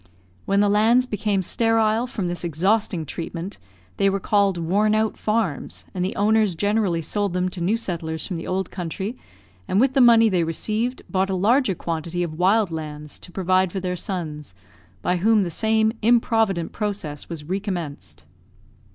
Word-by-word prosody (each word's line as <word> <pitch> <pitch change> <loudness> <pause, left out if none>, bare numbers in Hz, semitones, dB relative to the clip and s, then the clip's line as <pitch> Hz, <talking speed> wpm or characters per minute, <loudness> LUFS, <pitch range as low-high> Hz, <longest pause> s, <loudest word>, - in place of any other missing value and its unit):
When 200 +1 +2
the 205 - +4
lands 220 +5 +4
became 210 -4 -1
sterile, 225 +3 +2
from 215 -7 -3
this 175 0 -3
exhausting 180 +1 0
treatment, 170 +5 -6 0.4
they 195 - +3
were 195 0 -1
called 200 -1 +2
"worn 200 +6 +2
out 220 0 +1
farms;" 215 -9 -2
and 180 - -2
the 185 - -2
owners 210 -2 +2
generally 205 -3 0
sold 200 +3 -1
them 180 0 0
to 180 -1 -6
new 200 +7 +1
settlers 160 -7 -4
from 180 - -4
the 165 - -6
old 190 0 -2
country, 190 +5 -4 0.5
and 190 - +1
with 265 +2 +3
the 270 - +4
money 230 -2 +7
they 185 -5 +2
received, 215 +9 -2
bought 190 0 0
a 190 - 0
larger 215 +2 +2
quantity 170 +1 -3
of 160 -1 -5
wild 195 +1 +3
lands, 150 -2 -6
to 175 - -13
provide 185 0 +1
for 195 - -3
their 180 -1 -2
sons; 155 - -5 0.5
by 180 - +1
whom 215 +3 +3
the 175 - -3
same 220 +3 +2
improvident 225 -6 +2
process 195 -9 -4
was 165 -3 -6
recommenced. 165 - -5
190 Hz, 170 wpm, -23 LUFS, 170-215 Hz, 0.5 s, money